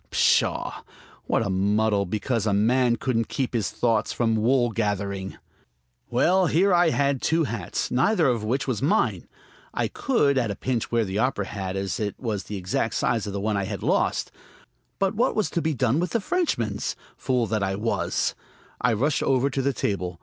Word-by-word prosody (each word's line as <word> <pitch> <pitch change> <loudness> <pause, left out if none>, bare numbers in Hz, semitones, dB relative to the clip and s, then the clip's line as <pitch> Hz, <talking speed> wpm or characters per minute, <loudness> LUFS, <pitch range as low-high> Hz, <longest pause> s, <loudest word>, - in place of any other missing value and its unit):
Pshaw! - - +1 0.5
what 115 - +1
a - - -2
muddle 100 +1 +1
because 110 +3 -1
a 105 - +2
man 120 +3 +3
couldn't 115 -2 -1
keep 135 -4 -2
his 115 -4 0
thoughts 115 -3 0
from 115 -2 +1
wool 120 +2 +2
gathering! 100 -3 -2 0.7
Well, 185 0 +3
here 185 +5 +3
I 175 -1 +5
had 140 -3 +1
two 165 +1 +2
hats, 115 -7 -3
neither 160 - +3
of 120 -4 0
which 125 +7 -1
was 125 -4 -1
mine. 165 +10 +1 0.5
I - - +1
could, 145 - +1
at 115 -3 -1
a 100 - -3
pinch, 125 0 -2
wear 115 -1 +2
the 95 +2 -3
opera 120 -5 0
hat, 95 -1 -5
as 95 +4 -2
it 105 -2 -2
was 110 -6 -3
the 105 - -5
exact 95 +4 -1
size 115 -3 0
of 100 - -4
the 100 - -2
one 105 +1 -1
I 100 - -1
had 100 -1 -5
lost. - - +1 0.7
But 195 0 +1
what 240 +4 +1
was 215 -4 0
to 170 - 0
be 160 -1 -1
done 125 +2 +1
with 180 - -2
the 230 - +2
Frenchman's?... 195 - -1 0.2
Fool 125 -3 0
that 110 -1 -1
I 95 0 0
was! 110 +3 -1 0.5
I 125 - +3
rushed 135 +7 +1
over 135 +1 +2
to 135 - -1
the 140 +1 +1
table. 90 -7 -3
115 Hz, 195 wpm, -25 LUFS, 105-140 Hz, 0.7 s, I